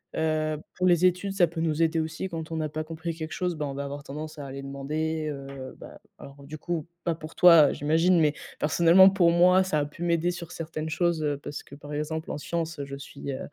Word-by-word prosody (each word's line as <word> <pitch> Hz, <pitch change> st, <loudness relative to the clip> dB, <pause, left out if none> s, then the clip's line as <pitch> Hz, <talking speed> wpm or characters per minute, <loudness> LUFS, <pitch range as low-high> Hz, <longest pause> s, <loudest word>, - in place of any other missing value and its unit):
Heu, 155 Hz, -1 st, 0 dB, 0.2 s
pour 185 Hz, -, +1 dB
les 175 Hz, 0 st, +4 dB
études 185 Hz, +2 st, -1 dB
ça 185 Hz, -3 st, +4 dB
peut 165 Hz, 0 st, -7 dB
nous 160 Hz, -1 st, 0 dB
aider 165 Hz, 0 st, +2 dB
aussi 160 Hz, +4 st, -3 dB
quand 165 Hz, -1 st, -6 dB
on -, -, -3 dB
n'a 155 Hz, -1 st, -2 dB
pas 155 Hz, +1 st, -4 dB
compris 165 Hz, +1 st, -5 dB
quelque 160 Hz, -1 st, -6 dB
chose, 180 Hz, -1 st, -2 dB
bah, 150 Hz, -1 st, -3 dB
on 140 Hz, -, -4 dB
va 140 Hz, +1 st, -4 dB
avoir 140 Hz, +1 st, -6 dB
tendance 155 Hz, +3 st, -7 dB
à 145 Hz, -, -6 dB
aller 135 Hz, 0 st, -7 dB
demander, 155 Hz, +3 st, -3 dB
heu, 135 Hz, -2 st, -8 dB
bah, -, -, -11 dB, 0.2 s
alors 140 Hz, 0 st, -12 dB
du 150 Hz, +3 st, -8 dB
coup, 170 Hz, -1 st, -3 dB, 0.2 s
pas 170 Hz, -2 st, 0 dB
pour 155 Hz, 0 st, -10 dB
toi 170 Hz, -5 st, +7 dB
j'imagine, 165 Hz, +5 st, +3 dB
mais 150 Hz, -2 st, +2 dB, 0.2 s
personnellement, 170 Hz, +5 st, +6 dB
pour 185 Hz, -3 st, +3 dB
moi 180 Hz, +2 st, +5 dB
ça 185 Hz, -5 st, 0 dB
a 145 Hz, -, 0 dB
pu 150 Hz, +4 st, -8 dB
m'aider 170 Hz, 0 st, +1 dB
sur 175 Hz, -1 st, -6 dB
certaines 160 Hz, -1 st, -5 dB
choses, 165 Hz, 0 st, 0 dB
heu, 145 Hz, -1 st, 0 dB
parce 145 Hz, -, -7 dB
que, -, -, -17 dB
par 145 Hz, +1 st, -10 dB
exemple, 160 Hz, +2 st, -3 dB
en -, -, -3 dB
science, 165 Hz, +2 st, -3 dB
heu, 140 Hz, -, -3 dB
je 140 Hz, 0 st, -7 dB
suis, 140 Hz, 0 st, -7 dB
heu, 130 Hz, -, -5 dB
160 Hz, 245 wpm, -27 LUFS, 145-170 Hz, 0.2 s, toi